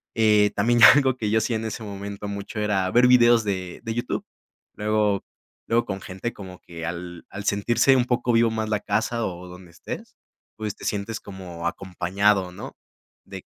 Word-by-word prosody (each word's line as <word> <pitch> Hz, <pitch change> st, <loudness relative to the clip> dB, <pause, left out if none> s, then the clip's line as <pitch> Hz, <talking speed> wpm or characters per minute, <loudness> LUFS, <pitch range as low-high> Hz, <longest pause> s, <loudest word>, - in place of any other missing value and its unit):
Eh, 105 Hz, -2 st, +4 dB
también 120 Hz, +4 st, +2 dB
ya 110 Hz, -, +11 dB
algo 135 Hz, -3 st, +3 dB
que 105 Hz, -3 st, -2 dB
yo 110 Hz, -, +2 dB
hacía 110 Hz, +1 st, 0 dB
en 110 Hz, -, -5 dB
ese 110 Hz, +1 st, -5 dB
momento 100 Hz, 0 st, -6 dB
mucho, 100 Hz, +2 st, -5 dB
era 100 Hz, -3 st, 0 dB
ver 120 Hz, +3 st, +5 dB
videos 120 Hz, -2 st, +6 dB
de 95 Hz, -3 st, -4 dB
de 115 Hz, -2 st, -3 dB
YouTube. 120 Hz, -, -3 dB, 0.5 s
Luego 105 Hz, -1 st, 0 dB, 0.4 s
luego 120 Hz, 0 st, +2 dB
con 95 Hz, 0 st, -5 dB
gente 95 Hz, +6 st, -5 dB
como 95 Hz, -2 st, -10 dB
que 85 Hz, -1 st, -8 dB
al 85 Hz, 0 st, -7 dB
al 100 Hz, 0 st, -7 dB
sentirse 120 Hz, +7 st, +3 dB
un 125 Hz, -2 st, +2 dB
poco 120 Hz, -1 st, 0 dB
vivo 115 Hz, 0 st, +4 dB
más 110 Hz, -1 st, -3 dB
la 105 Hz, -2 st, +1 dB
casa, 110 Hz, +3 st, -1 dB
o 90 Hz, 0 st, -6 dB
donde 90 Hz, 0 st, -12 dB
estés, 85 Hz, -, -9 dB, 0.4 s
pues, 105 Hz, -2 st, -4 dB
te -, -, -14 dB
sientes 105 Hz, +2 st, -2 dB
como 90 Hz, -4 st, -7 dB
acompañado, 95 Hz, +1 st, 0 dB
¿no?, 90 Hz, -, -9 dB, 0.5 s
de -, -, -9 dB
105 Hz, 185 wpm, -24 LUFS, 95-115 Hz, 0.5 s, ya